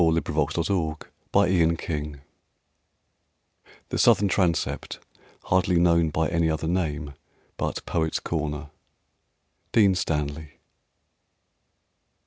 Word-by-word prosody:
IN 80 -1 +4
WESTMINSTER 80 +1 0 0.4
ABBEY 85 -5 +1 1.7
"The - - -2
Southern 100 -1 +4
Transept, 90 -4 0 0.5
hardly 90 -1 +2
known 85 -2 +3
by 80 +1 0
any 85 -1 +1
other 80 0 -2
name 75 -4 -2 0.4
but - - -3
Poet's 80 -2 -1
Corner." 75 -3 -4 1.0
DEAN 100 -4 +5
STANLEY. 75 -4 -3
80 Hz, 85 wpm, -25 LUFS, 75-90 Hz, 1.7 s, DEAN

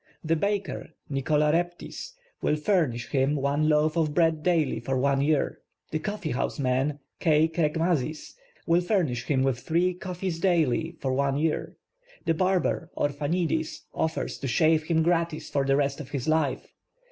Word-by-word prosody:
The 165 0 +2
baker, 200 +3 -2 0.2
Nicolas 150 +2 +2
Raptis, 175 - -3 0.3
will - - +2
fur 170 +1 +2
nish 120 -1 -6
him 135 +1 +2
one 145 +2 +1
loaf 155 +1 +3
of 155 -3 0
bread 165 -2 +3
daily 165 -4 +1
for 135 0 -2
one 135 +1 +2
year. 150 0 +1 0.3
The 155 - -1
coffeehouse 170 -9 -2
man, 135 +2 0 0.2
K. 155 -2 +4
Krekmazis, 160 -2 -1 0.3
will 170 +1 +3
furnish 165 - 0
him 135 -3 +1
with 135 -3 +1
three 175 +6 +1
coffees 180 -1 -4
daily 165 -3 +1
for 130 -1 -1
one 140 +1 +1
year. 155 +1 -1 0.5
The 165 - +3
barber, 185 +1 0
Orphanidis, 155 +2 -1
offers 160 0 -2
to 135 - -3
shave 155 +5 +3
him 160 -1 +2
gratis 170 -1 0
for 140 -1 +1
the 135 0 +3
rest 140 0 0
of 145 - -7
his 140 -2 -4
life. 155 -4 0
155 Hz, 160 wpm, -27 LUFS, 140-170 Hz, 0.5 s, K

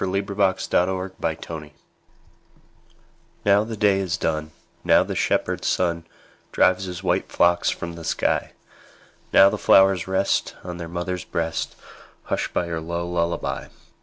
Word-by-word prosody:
Louisa 100 +2 -2
May 100 0 +1
Alcott 95 -1 0
Lullaby 95 -3 -3 2.1
NOW 100 +1 +5
the 110 0 -6
day 100 -2 +3
is 95 -2 -1
done, 80 -2 -2 0.3
Now - - +5
the - - -5
shepherd - - 0
sun 85 -2 0 0.4
Drives 95 +1 +3
his 90 0 -6
white 90 - 0
flocks 85 0 +3
from 85 0 -4
the 85 0 -9
sky; - - 0 0.8
Now 95 - +7
the - - -3
flowers 95 -2 +5
rest 95 +1 0
On 90 -1 -6
their 85 -1 -6
mother's 90 +1 -3
breast, 80 -1 -3 0.5
Hushed - - -2
by 90 - 0
her 85 -1 -4
low 85 +1 -3
lullaby. 85 -1 -2
90 Hz, 140 wpm, -23 LUFS, 85-95 Hz, 2.1 s, Now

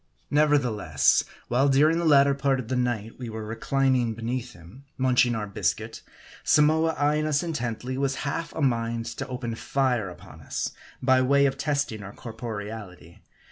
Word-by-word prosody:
Nevertheless, 145 -7 +3 0.2
while 130 +4 +2
during 155 +5 +4
the 170 - -1
latter 140 -2 +6
part 135 -1 +1
of 120 -2 -6
the 130 - 0
night 120 -3 -2
we 125 -2 -5
were 110 -1 -6
reclining 125 +1 0
beneath 120 +2 -4
him, 90 +11 -15
munching 125 -2 +3
our 110 -2 -2
biscuit, 100 - -2 0.4
Samoa 160 +2 +3
eyeing 150 +1 +1
us 145 0 +1
intently, 130 -5 -3
was 135 -1 0
half 165 +4 -3
a 160 - -3
mind 115 -2 0
to - - -4
open 125 -2 -4
fire 125 -4 0
upon 90 - -13
us - - -3 0.3
by 130 0 +4
way 140 +2 +4
of 135 -1 +1
testing 140 -6 -1
our 100 0 -9
corporeality. 110 -6 -8
130 Hz, 160 wpm, -26 LUFS, 115-140 Hz, 0.4 s, latter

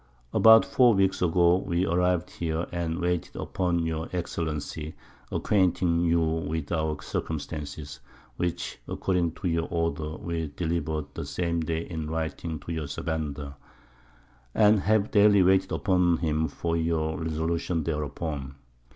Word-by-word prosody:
_About 110 0 +8
four 130 -5 +4
Weeks 95 -1 +2
ago 85 0 +4
we 90 -1 -1
arriv'd 90 0 +1
here, 80 0 -2
and 85 -1 -2
waited 90 -1 -1
upon 85 -2 -1
your 80 0 -3
Excellency, 80 -3 -4 0.4
acquainting 90 -4 +2
you 85 0 +3
with 80 -1 -2
our 80 -2 -1
Circumstances, 75 -2 -5 0.4
which 90 -1 -3
according 90 -4 0
to 90 - -4
your 85 -1 0
Order 85 -2 -2
we 85 -2 -3
delivered 80 -3 -1
the - - -5
same 85 +4 -1
Day 80 +1 -2
in 80 -3 -4
Writing 80 0 -3
to - - -7
your_ 80 -3 -3
Sabandar, 75 -2 -4 1.0
_and 105 0 +5
have 105 +1 +2
daily 100 -2 +6
waited 95 +1 +3
upon 90 -4 +2
him 80 -1 0
for 85 +1 -2
your 80 0 0
Resolution 80 +1 -1
thereupon. 75 -2 -3
85 Hz, 135 wpm, -27 LUFS, 80-90 Hz, 1.0 s, About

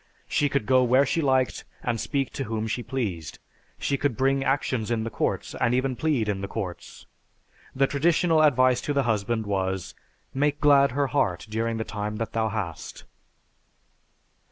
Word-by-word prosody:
She 145 - +1
could 135 -5 -1
go 130 +1 +4
where 130 +3 +4
she 165 +4 0
liked 130 -5 +1 0.2
and 120 -2 -1
speak 135 -2 -2
to 135 - -3
whom 110 -1 -2
she 110 +2 -2
pleased. 100 - -4 0.4
She 140 - -1
could 140 -6 0
bring 135 +1 +2
actions 130 -5 0
in 115 -2 0
the 115 - -4
courts - - -2
and 115 +1 +3
even 130 0 0
plead 140 -7 0
in 100 -2 -1
the 100 - -3
courts. 95 -4 -6 0.7
The 135 +1 +4
traditional 160 +3 +2
advice 130 -4 +4
to 145 - -2
the 140 -1 +2
husband 110 -1 0
was, 95 -2 -2 0.4
"Make 145 +2 +1
glad 140 -3 +5
her 140 +1 +1
heart 90 -11 +1
during 115 +1 -2
the 110 - -2
time 105 -1 -4
that 115 +1 -4
thou 110 -1 0
hast." 100 -7 -5
125 Hz, 175 wpm, -26 LUFS, 110-140 Hz, 0.7 s, glad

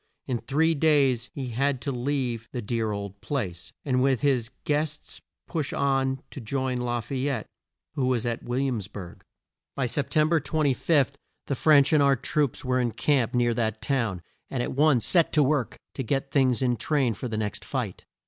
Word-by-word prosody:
In 125 -2 -1
three 160 +6 +2
days 140 -6 +3
he 130 -3 -4
had 135 +3 0
to 140 - -2
leave 125 -3 -2
the 125 - -3
dear 110 0 -1
old 100 -1 -6
place, 95 - -4
and 130 -3 +2
with 130 -3 +2
his 130 -6 +1
guests 150 0 -2 0.3
push 155 -5 -2
on 135 -1 +1
to 140 - -7
join 130 +2 -1
La 120 -1 -1
fay 135 +3 -2
ette, 135 -6 -2 0.5
who 135 -4 0
was 125 -3 +1
at 120 -1 -2
Will 120 +1 -2
iams 125 -8 -1
burg. 95 -4 -9 0.5
By 135 - 0
Sep 125 +4 -1
tem 155 0 +3
ber 165 -1 +4
25, 145 -1 +1 0.3
the - - -1
French 145 +1 +5
and 150 - +5
our 140 -1 +5
troops 140 +1 -1
were 130 0 +1
in 120 -3 0
camp 130 -4 +1
near 120 -1 +3
that 110 -2 -1
town, 110 -7 -1 0.3
and 125 -3 -1
at - - -3
once 140 -3 +3
set 170 -3 +3
to 150 - +5
work 140 -3 0 0.2
to - - -4
get 135 +2 -1
things 130 -3 +3
in 125 -2 +1
train 135 -5 +1
for 125 - -5
the 110 -2 -3
next 105 -2 -2
fight. - - -4
130 Hz, 195 wpm, -26 LUFS, 120-140 Hz, 0.5 s, French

